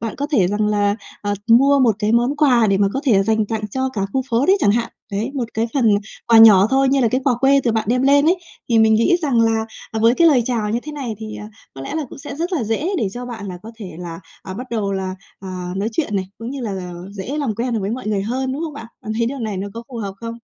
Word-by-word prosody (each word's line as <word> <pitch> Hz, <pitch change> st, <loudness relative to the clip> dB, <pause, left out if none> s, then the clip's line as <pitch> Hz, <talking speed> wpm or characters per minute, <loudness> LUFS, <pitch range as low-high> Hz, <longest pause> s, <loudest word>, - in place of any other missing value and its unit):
bạn 225 Hz, -1 st, -4 dB
có 285 Hz, -, -2 dB
thể 195 Hz, -10 st, +3 dB
rằng 210 Hz, +2 st, 0 dB
là, 205 Hz, -1 st, +1 dB, 0.3 s
ờ, 205 Hz, 0 st, -1 dB, 0.2 s
mua 275 Hz, +5 st, +6 dB
một 235 Hz, -6 st, +3 dB
cái 215 Hz, +1 st, 0 dB
món 240 Hz, +5 st, +2 dB
quà 255 Hz, -7 st, +4 dB
để 195 Hz, -1 st, +2 dB
mà 200 Hz, 0 st, +3 dB
có 270 Hz, -, -2 dB
thể 210 Hz, -8 st, +4 dB
dành 220 Hz, +1 st, +1 dB
tặng 215 Hz, 0 st, -3 dB
cho 260 Hz, +4 st, -1 dB
cả 200 Hz, -, -2 dB
khu 265 Hz, -, +1 dB
phố 235 Hz, +3 st, +2 dB
đấy 385 Hz, +2 st, +5 dB
chẳng -, -, +4 dB
hạn. 230 Hz, +2 st, 0 dB, 0.2 s
Đấy, 215 Hz, +6 st, -2 dB
một 260 Hz, -4 st, -1 dB
cái 225 Hz, +1 st, 0 dB
phần 265 Hz, -, +2 dB, 0.4 s
quà 230 Hz, -1 st, +6 dB
nhỏ 210 Hz, -4 st, +8 dB
thôi 270 Hz, 0 st, +3 dB
như 275 Hz, +1 st, +2 dB
là 235 Hz, -, +3 dB
cái 255 Hz, +4 st, 0 dB
quà 260 Hz, -, +3 dB
quê 275 Hz, +2 st, +4 dB
từ 235 Hz, -, +2 dB
bạn 220 Hz, -1 st, 0 dB
đem 250 Hz, +2 st, +2 dB
lên 285 Hz, +2 st, +4 dB
ấy. 350 Hz, +3 st, +4 dB, 0.3 s
Thì 230 Hz, -2 st, +3 dB
mình 220 Hz, 0 st, +5 dB
nghĩ 230 Hz, +11 st, +3 dB
rằng 265 Hz, -6 st, +2 dB
là 225 Hz, -1 st, +2 dB, 0.4 s
với 230 Hz, +2 st, +5 dB
cái 335 Hz, +4 st, +5 dB
lời 265 Hz, -6 st, +4 dB
chào 225 Hz, -4 st, -1 dB
như 230 Hz, -, 0 dB
thế 300 Hz, -, -7 dB
này 265 Hz, -6 st, -4 dB
thì, 220 Hz, -1 st, -7 dB
ờ, 210 Hz, -, -8 dB, 0.3 s
có 135 Hz, -, -9 dB
lẽ 135 Hz, -, -6 dB
là 315 Hz, -1 st, -1 dB
cũng -, -, -11 dB
sẽ 280 Hz, 0 st, -7 dB
rất 340 Hz, +4 st, -3 dB
là 300 Hz, -10 st, 0 dB
dễ 225 Hz, -, -1 dB
để 210 Hz, -, 0 dB
cho 245 Hz, 0 st, -6 dB
bạn 225 Hz, -4 st, -7 dB
là 180 Hz, -1 st, -7 dB
có 225 Hz, -, -9 dB
thể 210 Hz, -, -7 dB
là, 170 Hz, -1 st, -7 dB, 0.2 s
à, 190 Hz, -, -7 dB
bắt 250 Hz, +6 st, -6 dB
đầu 210 Hz, -4 st, -1 dB
là, 190 Hz, -1 st, -3 dB, 0.3 s
à, 185 Hz, -2 st, -6 dB
nói 200 Hz, +3 st, -1 dB
chuyện 220 Hz, -5 st, -1 dB
này, 190 Hz, -, -1 dB
cũng 230 Hz, +2 st, -6 dB
như 275 Hz, 0 st, -5 dB
là 190 Hz, -6 st, -4 dB, 0.2 s
dễ 205 Hz, +8 st, -5 dB
làm 270 Hz, -7 st, -1 dB
quen 240 Hz, +3 st, -2 dB
được 220 Hz, -, -1 dB
với 195 Hz, +1 st, -2 dB
mọi 240 Hz, -1 st, -5 dB
người 205 Hz, -2 st, 0 dB
hơn, 260 Hz, +5 st, -2 dB
đúng 290 Hz, +5 st, -4 dB
không 315 Hz, -, -5 dB
bạn? 230 Hz, -, -8 dB, 0.2 s
Bạn 215 Hz, -, -4 dB
thấy 230 Hz, -, +2 dB
điều 275 Hz, +3 st, -4 dB
này 215 Hz, -5 st, -3 dB
nó 195 Hz, +2 st, -4 dB
có 230 Hz, -, -6 dB
phù 255 Hz, -, -8 dB
hợp 200 Hz, -4 st, -4 dB
không? 230 Hz, 0 st, -6 dB
230 Hz, 295 wpm, -20 LUFS, 205-265 Hz, 0.4 s, nhỏ